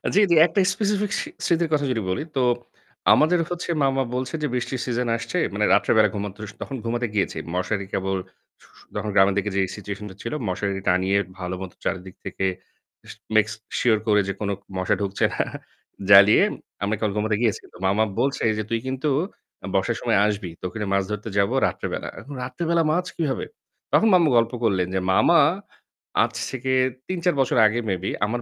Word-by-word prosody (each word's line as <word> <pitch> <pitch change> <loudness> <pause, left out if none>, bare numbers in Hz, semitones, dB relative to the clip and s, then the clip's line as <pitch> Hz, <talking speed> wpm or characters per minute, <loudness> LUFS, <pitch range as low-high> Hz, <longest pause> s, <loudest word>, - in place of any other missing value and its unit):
জি, - - +6
জি - - +6
একটা 175 +4 0
স্পেসিফিক 205 0 0
স - - 0 0.2
স্মৃতির 170 -1 +1
কথা 145 -1 +2
যদি 115 -3 -1
বলি, 95 +11 -1
তো 130 - +2 0.7
আমাদের 170 +3 +4
হচ্ছে 175 0 -4
মামা 135 -1 +2
বলছে, 125 0 -3
যে - - +2
বৃষ্টির 125 +1 -2
সিজন 125 -1 -1
আসছে। 115 - -4 0.2
মানে - - +1
রাত্রে - - +3
বেলা 105 -2 +5
ঘুমাতে 100 0 -5
স - - -21
তখন 135 - -5
ঘুমাতে 120 +1 -1
গিয়েছি। 100 -2 0 0.2
মশারি 100 +2 -1
কেবল 95 0 -1 0.4
ছু - - -20 0.3
তখন 105 - -2
গ্রামের 95 0 +5
দিকে 105 +1 0
যে 100 - +3
সিচুয়েশনটা 100 -1 -7
ছিল - - -4
মশারি 95 +1 -2
টানিয়ে 95 +2 +2 0.2
ভাল 90 -1 -5
মত 95 -2 -6
চারিদিক 95 -1 -4
থেকে 95 - -3 0.7
স - - -8 0.2
make 105 0 +3 0.3
sure 110 -3 +3
করে 105 -1 +4
যে 100 - -1
কোন 105 - -2 0.3
মশা 95 0 +1
ঢুকছে 100 -1 0
না - - 0 0.7
জ্বালিয়ে 100 +1 +8 0.4
আমরা 105 +2 0
কল 105 - +1
ঘুমাতে 105 0 +1
গিয়েছি, 115 -4 +1
তো - - -13
মামা 105 +3 +3 0.2
বলছে, 135 +3 0 0.2
যে 110 - -1
"তুই 115 0 0
কিন্তু 135 +3 -1 0.6
বর্ষার - - +1
সময় - - +2
আসবি। 105 -3 -2
তকে 90 +2 -5
নিয়ে 105 -2 -2
মাছ 100 - +2
ধরতে 105 +1 -4
যাব 100 0 +3 0.2
রাত্রে - - -4
বেলা।" - - -4
এখন 145 - -10
রাত্রেবেলা 165 +6 0
মাছ 180 +3 +1
কীভাবে? 150 -5 -1 0.5
তখন 225 - +5
মামু 170 -4 +5
গল্প 115 +1 +3
করলেন 95 -5 +2
যে - - +2
মামা 170 - +5 0.8
আজ - - -2 0.2
থেকে 130 0 -2 0.3
৩-৪ 180 -3 0
বছর 130 - +1
আগে 115 +3 0
maybe 95 0 -2 0.2
আমার 120 +3 -2
110 Hz, 185 wpm, -23 LUFS, 100-135 Hz, 0.8 s, জ্বালিয়ে